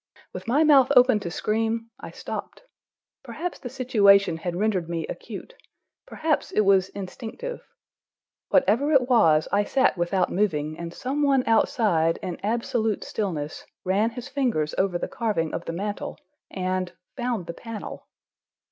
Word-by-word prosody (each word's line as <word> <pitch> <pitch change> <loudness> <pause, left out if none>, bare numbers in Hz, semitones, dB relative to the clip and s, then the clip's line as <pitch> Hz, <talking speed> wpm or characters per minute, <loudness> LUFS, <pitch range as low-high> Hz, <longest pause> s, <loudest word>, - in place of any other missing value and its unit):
With - - -8
my 280 +7 +3
mouth 280 -4 +6
open 250 -3 +6
to 175 - -5
scream, 225 +5 -1
I - - -8
stopped. - - -7 0.6
Perhaps 355 0 -5
the 245 - -7
situation 200 -8 +4
had 175 +1 -4
rendered 185 -4 0
me 165 -2 -2
acute, - - -8 0.5
perhaps 310 -2 -1
it - - +3
was 195 -2 +4
instinctive. 225 - -7 0.9
Whatever 275 +2 +3
it 255 -3 +4
was, 160 -11 +4
I 200 +1 +3
sat 260 -4 +2
without 180 +1 +1
moving, 155 -6 0
and 170 -1 -5
some 265 +10 -3
one 275 -3 +3
outside, 205 -7 +2
in 180 - -4
absolute 225 0 -1
stillness, 160 -8 -4 0.2
ran 200 +5 +2
his 245 +2 -8
fingers 245 - -1
over 190 -2 +1
the - - -3
carving 205 -10 -1
of - - -4
the - - -3
mantel 205 - -4 0.3
and—found 185 +4 -3
the 170 - -6
panel. 225 +3 -8
210 Hz, 145 wpm, -25 LUFS, 180-250 Hz, 0.9 s, mouth